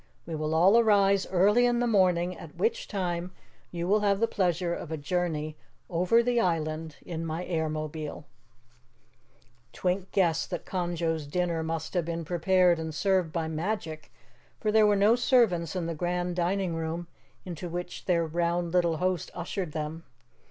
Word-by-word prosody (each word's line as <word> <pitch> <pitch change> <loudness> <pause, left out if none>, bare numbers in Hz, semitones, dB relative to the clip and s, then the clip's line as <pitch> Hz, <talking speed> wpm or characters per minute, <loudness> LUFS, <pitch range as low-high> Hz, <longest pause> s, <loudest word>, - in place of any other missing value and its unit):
We 165 - -6
will 155 0 -1
all 190 +8 +6
arise 200 -3 +4
early 205 +7 +4
in 240 -1 +1
the 245 - +2
morning, 185 -5 +2
at 160 -2 -11
which 470 +2 -1
time 180 -2 -3 0.4
you 170 0 -4
will 210 +3 +4
have 200 -1 +2
the 230 - +4
pleasure 175 -3 0
of 165 - -6
a 160 - -2
journey 155 -1 -2 0.3
over 180 +7 +3
the 245 0 +2
island 160 -4 -1
in 165 -2 -4
my 165 +2 -3
Airmobile." 155 -2 -3 1.5
Twink 185 +1 -2
guessed 170 -4 +1
that - - -4
Conjo's 170 -4 -2
dinner 170 +1 -1
must 160 0 -4
have 175 -3 0
been 170 -1 -4
prepared 180 +1 +3
and 160 -1 -5
served 185 -1 +1
by 165 -1 -2
magic, 160 -1 -4 0.5
for 215 - 0
there 215 0 +5
were 205 - +4
no 205 +3 +5
servants 220 - +2
in 180 -2 -1
the 165 - -2
grand 175 +2 -2
dining 180 0 0
room 165 +1 -3 0.4
into 175 -1 -6
which 175 +1 -6
their 170 -2 +2
round 170 +1 -1
little 170 -3 +2
host 180 -1 -1
ushered 175 -1 -4
them. 155 +1 -4
175 Hz, 165 wpm, -28 LUFS, 160-190 Hz, 1.5 s, all